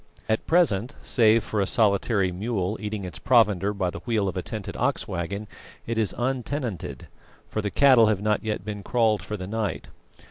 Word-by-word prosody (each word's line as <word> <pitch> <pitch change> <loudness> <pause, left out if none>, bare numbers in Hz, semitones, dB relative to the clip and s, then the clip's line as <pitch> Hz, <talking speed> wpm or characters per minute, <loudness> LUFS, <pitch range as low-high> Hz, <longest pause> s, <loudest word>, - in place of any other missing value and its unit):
At 110 0 -1
present, 130 - +2
save 115 -2 +4
for 105 +3 -1
a 100 - 0
solitary 100 -3 +2
mule 100 +1 -2
eating 105 -2 -4
its 90 - -6
provender 105 -6 +3
by 95 -3 -1
the - - -7
wheel 110 -4 0
of 95 - -3
a - - -1
tented - - -6
ox - - 0
waggon, 100 +5 -4 0.4
it 115 0 -2
is 105 -5 0
untenanted, 125 - -3 0.4
for 110 - -3
the 105 - -2
cattle 130 -2 +6
have 105 -3 +1
not 105 +2 0
yet 105 -3 -3
been 105 -1 -5
kraaled 110 -2 +1
for 105 - -5
the 95 - -6
night. 105 0 -3
105 Hz, 185 wpm, -25 LUFS, 100-115 Hz, 0.4 s, cattle